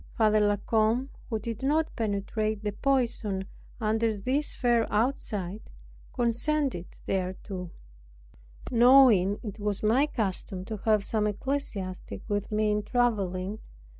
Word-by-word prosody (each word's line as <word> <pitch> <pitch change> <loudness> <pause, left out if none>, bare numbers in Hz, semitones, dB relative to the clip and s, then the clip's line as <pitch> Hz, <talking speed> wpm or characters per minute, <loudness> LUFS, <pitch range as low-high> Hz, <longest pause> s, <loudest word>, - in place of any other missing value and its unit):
Father 215 -1 +4
La 205 -1 +3
Combe, 225 +5 +1 0.2
who 225 - 0
did 225 +1 -5
not 305 +4 +1
penetrate 215 0 -2
the 210 - -1
poison 230 -5 0 0.3
under 220 0 +1
this 265 +9 0
fair 240 -2 +1
outside, 210 -4 -2 0.4
consented 245 - 0 0.2
thereto; 185 -1 -3 1.0
knowing 235 -5 +6
it 210 -1 -6
was 205 -1 -2
my 245 +7 +4
custom 190 -6 -3
to 220 +1 -5
have 215 -2 +3
some 210 0 0
ecclesiastic 210 -5 -3
with 205 -1 -2
me 215 0 +2
in 210 0 +1
traveling. 205 -4 0
215 Hz, 120 wpm, -28 LUFS, 200-240 Hz, 1.0 s, knowing